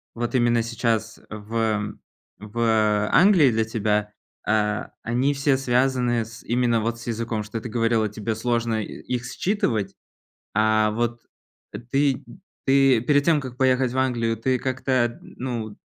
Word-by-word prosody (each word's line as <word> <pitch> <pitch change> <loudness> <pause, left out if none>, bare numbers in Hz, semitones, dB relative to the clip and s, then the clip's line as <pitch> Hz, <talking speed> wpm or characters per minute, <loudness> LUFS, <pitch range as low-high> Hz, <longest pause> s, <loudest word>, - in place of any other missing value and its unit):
вот 120 +2 -3
именно 120 -1 +3
сейчас 115 -1 -1
в 110 -1 -2 0.4
в 105 -1 +1
Англии 175 -8 +6
для 110 0 +1
тебя, 105 -1 -1 0.4
э, 105 -1 +1 0.2
они 125 +5 +1
все 140 0 +2
связаны 125 -2 +1
с 115 +1 -12
именно 120 -1 +1
вот 115 +1 -2
с 120 - -11
языком, 115 -1 -2
что 110 +1 -6
ты 120 - -6
говорила, 115 -1 +1
тебе 110 +1 -3
сложно 115 -1 0
их 125 +4 -5
считывать, 125 - -1 0.6
а 110 0 +3
вот 120 +1 -2 0.7
ты 140 -1 +1 0.4
ты 135 -3 +5
перед 145 +4 +2
тем, 160 -3 +3
как 130 -3 -8
поехать 130 -1 +2
в 130 - -3
Англию, 115 -3 0
ты 130 +3 0
как-то, 130 -2 0
ну, 115 -5 -6
115 Hz, 140 wpm, -24 LUFS, 110-130 Hz, 0.7 s, Англии